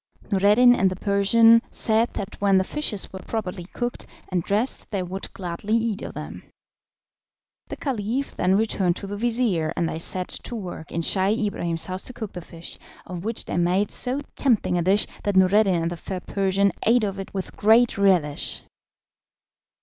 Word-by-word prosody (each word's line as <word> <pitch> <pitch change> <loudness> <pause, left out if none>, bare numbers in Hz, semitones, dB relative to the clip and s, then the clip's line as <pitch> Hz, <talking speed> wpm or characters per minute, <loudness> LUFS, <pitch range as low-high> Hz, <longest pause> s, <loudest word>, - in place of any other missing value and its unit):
Noureddin 210 +5 +5
and 190 -5 +2
the 185 - -4
Persian 220 +4 +4
said 225 +1 +1
that 200 0 -6
when 200 -1 +4
the 190 - +3
fishes 215 -5 -3
were 190 - -6
properly 185 -4 -5
cooked 240 +6 -5 0.2
and 180 -2 0
dressed 210 +8 0
they 195 -4 -2
would 185 +2 -6
gladly 185 +4 -3
eat 225 -3 -1
of - - -7
them. - - -7 1.3
The - - -6
Caliph 255 0 -3
then 185 +1 +2
returned 195 -4 +1
to 200 - -7
the 200 +1 -5
vizir, 225 -8 0
and 170 - +1
they 160 - -4
set 180 +2 -3
to 240 - -3
work 180 -6 -7
in 170 - -2
Scheih 200 +5 +2
Ibrahim's 170 -5 -1
house 185 0 -3
to 255 - -6
cook 220 -4 -7
the 180 - -6
fish, 165 0 -10 0.3
of 180 -1 -7
which 225 +2 -3
they - - -3
made 180 +4 +1
so 260 +3 +2
tempting 235 -9 +2
a 175 - +1
dish 195 +4 +3 0.2
that 205 -1 -1
Noureddin 190 +1 +4
and 165 +1 -2
the 175 - -5
fair 185 +3 -5
Persian 195 +1 +1
ate 235 +1 +3
of 200 -1 -2
it 195 - -7
with 190 - -5
great 225 +3 +4
relish. 180 -7 +1
200 Hz, 180 wpm, -24 LUFS, 185-225 Hz, 1.3 s, Noureddin